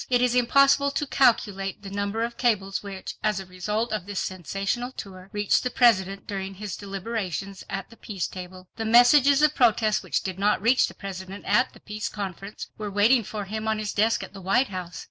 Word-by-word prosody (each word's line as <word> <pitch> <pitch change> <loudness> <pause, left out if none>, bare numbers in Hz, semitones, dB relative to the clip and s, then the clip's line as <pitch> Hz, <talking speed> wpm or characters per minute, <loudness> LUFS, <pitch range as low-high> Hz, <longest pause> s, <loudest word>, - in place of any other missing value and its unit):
It 245 -1 +3
is 250 -1 +2
impossible 275 +3 +4
to 285 +1 -2
calculate 205 -8 +1
the 195 - -8
number 200 +3 -2
of 235 0 -3
cables 200 -6 0
which, 195 -2 -7
as 210 -2 0
a 190 - -7
result 210 +5 -2
of 205 -3 -3
this 205 -2 -3
sensational 195 +7 -3
tour, 190 -5 -9
reached 205 -1 +2
the 250 - -1
President 200 -6 +3
during 195 -1 -5
his 205 0 -5
deliberations 195 -2 -5
at 195 +2 -5
the 230 - -15
Peace 195 -6 -4
Table. 185 0 -9
The 225 - -2
messages 265 +5 +6
of 305 0 +5
protest 220 -5 +3
which - - -2
did 190 -1 -5
not 205 +1 +2
reach 235 +6 +3
the - - -11
President 190 0 -8
at 250 - +2
the - - -16
Peace 210 0 -5
Conference 195 0 -6
were 210 -1 -3
waiting 220 +5 +4
for 210 0 -5
him 215 +2 -4
on 220 0 +1
his 215 -1 -3
desk 220 -1 +2
at 190 - -10
the 195 - -10
White 195 +8 +2
House. 180 -2 -6
205 Hz, 205 wpm, -25 LUFS, 195-235 Hz, -, messages